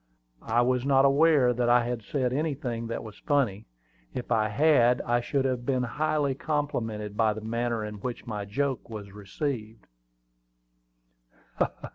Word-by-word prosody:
I 120 +2 +2
was 125 0 +1
not 135 0 +4
aware 140 -3 +5
that 120 0 0
I 120 0 +5
had 120 -1 -3
said 125 +3 -1
anything 130 -6 -2
that 115 - -4
was 110 -3 -11
funny: 130 -10 0 0.5
if 125 - -5
I 110 -2 +2
had, 125 -1 +4
I 120 0 +1
should 135 +2 -1
have 130 -2 -1
been 130 0 0
highly 150 +2 0
complimented 115 -8 -2
by 110 -1 +3
the 110 - -7
manner 115 0 -2
in 105 -1 -7
which 125 -2 -5
my 105 -3 -4
joke 135 +6 -2
was 105 -3 -7
received. 110 +2 -5
120 Hz, 150 wpm, -27 LUFS, 110-140 Hz, 0.5 s, aware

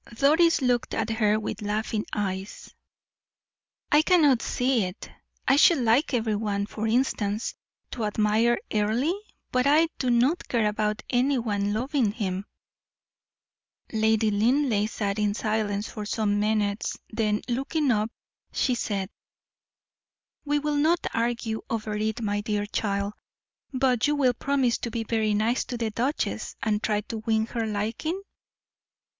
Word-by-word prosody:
Doris 315 +4 +4
looked 245 -1 +1
at 225 0 -1
her 215 -1 +2
with 220 - -5
laughing 210 +1 -2
eyes. 195 -1 -4 1.2
"I 295 - +6
cannot 310 -8 +4
see 250 -3 +1
it. 180 +2 -8 0.4
I 270 - +5
should 330 +2 +6
like 245 +4 +2
every 220 -2 0
one, 205 -1 -1
for 215 +1 -4
instance, 220 -3 0 0.4
to 230 -3 -3
admire 215 +3 +2 0.2
Earle, 220 +9 +1 0.4
but 255 +2 +2
I 315 +3 +5
do 255 - 0
not 250 +8 +2
care 230 -3 +1
about 210 0 -1
any 260 +2 +2
one 205 -4 -1
loving 240 0 0
him." 195 -3 -3 1.5
Lady 220 0 +2
Linleigh 225 0 +2
sat 205 -2 -2
in 205 -1 +1
silence 215 -1 -1
for 210 -2 -6
some 210 -2 0
minutes, 210 0 0
then 215 -1 0
looking 275 +3 0
up, 215 -1 +1 0.4
she 255 - +1
said: 200 -5 -2 1.4
"We 295 0 +1
will 295 0 -1
not 325 +4 +2
argue 230 -1 -1
over 215 -2 -2
it, 220 +2 -2
my 205 -1 0
dear 205 -1 -1
child; 200 -1 -2 0.6
but 255 -2 +2
you 295 - +2
will 260 -4 +3
promise 260 -1 +1
to 235 - -3
be 230 0 -3
very 220 -1 0
nice 225 +4 +1
to 245 - -5
the 225 -2 -2
duchess, 255 +7 -2
and 210 -2 +1
try 210 -2 0
to 220 +1 -6
win 220 0 +1
her 230 -1 -3
liking?" 220 - -2
220 Hz, 145 wpm, -26 LUFS, 210-255 Hz, 1.5 s, I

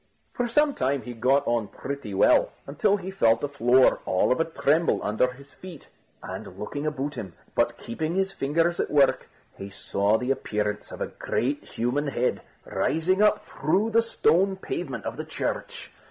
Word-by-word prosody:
For 245 - -1
some 295 +5 +3
time 135 - -1
he 125 - -7
got 130 +4 +2
on 120 -3 0
pretty 140 -1 -6
well, 95 - +4
until 200 - +1
he 190 -1 -6
felt 115 -12 +3
the 145 - -2
floor 130 -2 +4
all 95 - +2
of 125 - +2
a 165 - +2
tremble 160 0 +1
under 110 +5 +1
his 140 +2 -14
feet; 180 -5 -12 0.3
and - - -8
looking 145 +8 -4
about 145 -1 -3
him, 95 - -7 0.2
but - - +1
keeping 155 +8 -4
his 195 0 +1
fingers 165 +2 0
at - - 0
work, 140 -2 +3 0.3
he 100 - -6
saw 100 +2 0
the 125 +3 -1
appearance 105 -5 -2
of - - -9
a - - -1
great 140 +4 -1
human 130 +6 -2
head 125 -2 -1 0.2
rising 185 +5 0
up 210 0 +3
through 190 +10 0
the 230 +1 +5
stone 195 -4 +2
pavement 345 - -5
of - - -4
the - - -4
church. - - -4
140 Hz, 180 wpm, -26 LUFS, 120-180 Hz, 0.3 s, the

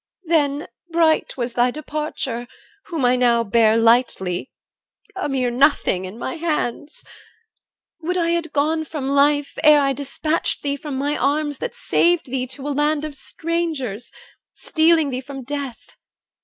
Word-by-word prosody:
Then 300 -3 +1 0.2
bright 330 -3 +2
was 240 -1 -3
thy 245 +1 +3
departure, 285 -4 -4 0.4
whom 320 -7 -2
I 245 +1 +4
now 240 -2 +3
Bear 225 +1 +3
lightly, 225 -4 +2 0.7
a 380 -6 -2
mere 255 -3 0
nothing, 245 -8 +2
in 190 +4 -8
my 260 +6 -4
hands. 305 -3 -3 1.0
Would 360 +3 -1
I 335 -1 +1
had 340 -1 -1
gone 315 +2 +1
from 300 -3 -5
life, 285 +1 +2
ere 300 -1 +8
I 275 -1 +2
dispatched 285 +4 -2
Thee 280 -1 0
from 285 0 -6
my 290 +2 0
arms 290 0 0
that - - -4
saved 345 -1 +2
thee 255 -1 -1
to 265 +3 -7
a 290 - -1
land 295 +1 +1
Of 305 - -6
strangers, 305 -9 -3 0.4
stealing 320 -3 +2
thee 255 0 -3
from 270 0 -8
death! 275 -2 -6
285 Hz, 150 wpm, -21 LUFS, 250-310 Hz, 1.0 s, ere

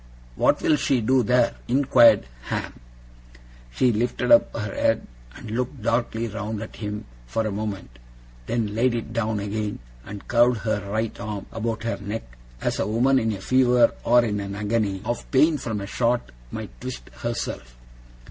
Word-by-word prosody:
'What - - +2
will 150 - +4
she 135 -2 +1
do 130 +3 +3
there?' 120 +1 +3
inquired 120 - +5 0.2
Ham. - - -3 1.0
She 120 - +2
lifted 120 - 0
up 295 - +6
her 105 -3 -3
head, - - +1 0.3
and 110 - -9
looked 125 +1 -3
darkly 115 0 0
round 110 0 -4
at 110 - -10
him 105 -1 -5 0.2
for 110 - -1
a 110 - -1
moment; 100 - -5 0.5
then 115 -3 -1
laid 120 +2 +2
it 115 -1 -4
down 110 -2 0
again, 105 +1 -3 0.3
and 100 +7 -9
curved 120 -2 +3
her 105 -3 -2
right 110 +2 -1
arm 105 -2 -5
about 115 0 -3
her 115 - -2
neck, 105 +3 -4 0.4
as - - -1
a - - 0
woman 125 +5 +3
in 110 -2 0
a 100 -2 -5
fever, 125 +1 +4
or 120 0 +5
in 105 -2 -1
an 100 0 -5
agony 105 -2 -1
of 120 +1 -3
pain 150 +3 +4
from 110 -5 -3
a 100 - -5
shot, 120 - 0 0.2
might - - -8
twist 60 - -7
herself. - - -4
110 Hz, 170 wpm, -24 LUFS, 105-120 Hz, 1.0 s, up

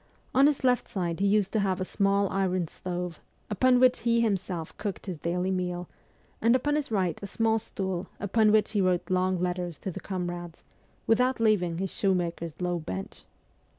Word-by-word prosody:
On 270 +2 +6
his 295 -2 0
left 250 -1 +2
side 175 -6 -2
he 200 - +2
used 200 -1 +2
to 220 - +2
have 190 -2 0
a 185 - -1
small 200 0 +2
iron 185 -3 0
stove, 180 -1 -5 0.3
upon 250 +4 +4
which 255 0 +5
he 235 0 +2
himself 190 -7 -1
cooked 205 -3 -4
his 180 -6 -5
daily 180 +3 -1
meal, 180 -1 -2 0.5
and 230 +2 +5
upon 290 +3 +1
his 300 -2 -1
right 190 -6 0
a 200 - -5
small 225 +2 +1
stool 190 -3 -4
upon 215 +2 +3
which 215 0 +3
he 210 -2 +1
wrote 185 -1 +1
long 185 0 +2
letters 180 -2 -2
to 190 - -5
the - - -6
comrades, 175 -3 -5 0.4
without 250 +3 +2
leaving 195 -7 +2
his 190 +1 -2
shoemaker's 170 -4 -1
low 180 -1 -1
bench. 95 - -6
190 Hz, 185 wpm, -28 LUFS, 180-215 Hz, 0.5 s, On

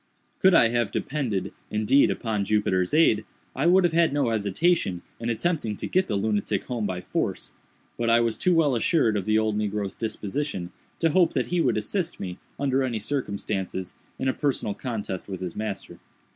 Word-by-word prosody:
Could 190 -1 +5
I 115 - +6
have 120 -2 0
depended, 110 -10 -2 0.2
indeed, 110 +6 +3
upon 110 -3 -1
Jupiter's 95 -3 +1
aid, 150 -9 +4 0.3
I 140 +5 +1
would 185 +2 +6
have 175 -2 +2
had 165 -2 +4
no 140 -4 +1
hesitation 105 - +1 0.2
in 115 0 -3
attempting 120 -3 -1
to - - -5
get 185 +1 +1
the 105 - -1
lunatic 105 0 0
home 120 -5 -2
by 90 -2 -3
force; - - -3 0.5
but 115 -1 +1
I 115 0 +5
was 115 -1 0
too 180 -2 +3
well 150 -5 +3
assured 120 -2 +2
of 100 - -1
the 110 0 +3
old 110 -1 +1
negro's 105 -1 -2
disposition, 110 -3 -3 0.3
to 165 -2 +2
hope 180 +1 +4
that - - +1
he 175 - +3
would 120 -7 +2
assist 170 - -2
me, 90 -1 -6 0.2
under 135 -1 +1
any 125 -4 -1
circumstances, 100 -6 -3 0.2
in 130 - -2
a 130 - +2
personal 140 -8 -1
contest 105 -6 -5
with 95 -2 -5
his 90 -2 -5
master. 105 -2 -5
115 Hz, 185 wpm, -26 LUFS, 100-145 Hz, 0.5 s, I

